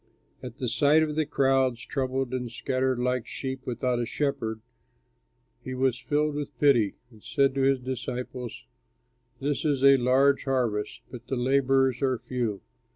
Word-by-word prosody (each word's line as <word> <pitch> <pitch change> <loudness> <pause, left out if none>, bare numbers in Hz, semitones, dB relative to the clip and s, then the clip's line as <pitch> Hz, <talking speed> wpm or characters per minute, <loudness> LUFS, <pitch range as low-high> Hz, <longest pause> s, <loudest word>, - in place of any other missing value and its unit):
At 125 +2 -9
sight 140 +6 +3
of 150 -1 -2
the 155 -1 0
crowds, 130 -5 +1
troubled 130 -1 -2
and 125 -2 -3
scattered 130 +1 -1
like 125 -1 -1
sheep 130 -1 -5
without 125 0 -1
a 120 - 0
shepherd, 115 -7 -2 1.0
he 130 - -5
was 130 -1 +1
filled 150 +2 0
with 145 -1 -5
pity, 120 -8 +4 0.2
and 110 -2 -18
said 135 +4 +1
to 135 - -1
his 135 0 +3
disciples, 125 - -5 0.7
"This 140 +1 -1
is 140 -3 0
a 140 0 +8
large 135 +3 +3
harvest, 120 -6 -1
but 120 -2 -10
the 135 - -2
laborers 135 0 +2
are 130 -2 +1
few. 115 -5 -3
130 Hz, 155 wpm, -27 LUFS, 125-135 Hz, 1.0 s, a